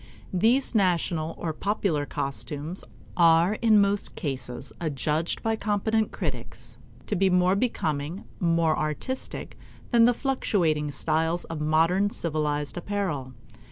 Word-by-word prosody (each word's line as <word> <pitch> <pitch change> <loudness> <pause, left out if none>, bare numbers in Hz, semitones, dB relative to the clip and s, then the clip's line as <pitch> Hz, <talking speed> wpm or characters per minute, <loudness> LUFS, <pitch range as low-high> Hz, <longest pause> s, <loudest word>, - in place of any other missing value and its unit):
These 230 +10 +3
national 170 -5 +1
or 160 -2 -3
popular 175 -6 -1
costumes 145 +5 -3 0.3
are 170 +4 +4
in 220 -2 +6
most 200 0 +1
cases 130 -5 -4
adjudged 155 +1 -1
by 225 0 +1
competent 220 +1 0
critics - - -5 0.3
to 210 - -1
be 190 +1 +3
more 180 +1 +3
becoming, 160 - -1 0.2
more 165 -2 +2
artistic, 155 - -4 0.4
than 235 -2 +6
the 245 - +5
fluctuating 170 - 0
styles 160 +4 0
of 160 -2 -6
modern 165 +6 +3
civilized 150 -4 -2
apparel. 175 -9 -3
170 Hz, 120 wpm, -26 LUFS, 155-205 Hz, 0.4 s, in